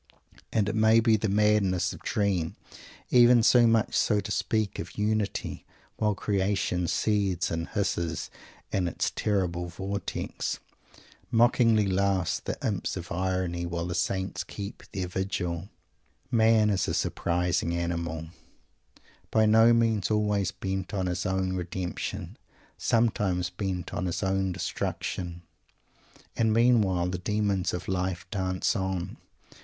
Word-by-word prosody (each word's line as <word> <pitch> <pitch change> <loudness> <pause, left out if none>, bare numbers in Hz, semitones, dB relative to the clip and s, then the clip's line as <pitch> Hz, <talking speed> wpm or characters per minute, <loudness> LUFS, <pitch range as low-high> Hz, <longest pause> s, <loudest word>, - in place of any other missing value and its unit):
And 105 -3 +1
it 105 - -1
may 110 +1 +5
be 115 -1 +4
the 110 0 0
madness 100 -3 +2
of - - -10
a - - -7
dream 95 -6 0 0.6
even 120 -1 +6
so 120 0 +6
much 115 -1 +3 0.2
as 105 -2 +2
to - - -5
speak 110 -1 -1
of - - -7
"unity" 105 -1 -1 0.3
while 105 -1 +1
creation 95 -3 0
seethes 100 -5 0
and 85 0 -3
hisses 85 -5 -2 0.4
in 95 -3 +1
its 85 - -1
terrible 90 -4 0
vortex. 95 +4 -4 0.7
Mockingly 115 -2 +4
laugh 95 -2 +1
the - - -3
imps 100 -3 -1
of 90 -1 -7
irony, 90 -1 -1
while 85 0 -3
the 90 - -3
Saints 95 +2 -1
keep 100 -1 -7
their 95 -2 -3
vigil. 90 -1 -3 0.6
Man 110 -2 +4
is 100 - 0
a - - -1
surprising 90 -1 0
animal; 85 -2 -3 1.0
by 110 0 +3
no 110 +2 +6
means 115 -4 +2
always 105 -3 +1
bent 95 +1 -4
on 95 -1 0
his 90 0 -2
own 95 0 0
redemption; 90 0 -4 0.4
sometimes 100 -6 +1
bent 90 -1 -4
on 90 - -2
his 85 - -2
own 95 0 +1
destruction! 90 -1 -4 0.9
And 110 -1 +2
meanwhile 110 -6 +3
the 90 0 -3
demons 100 -2 0
of 90 0 -5
life 90 -1 -2
dance 95 -1 0
on. 95 -3 -3
95 Hz, 135 wpm, -28 LUFS, 90-105 Hz, 1.0 s, even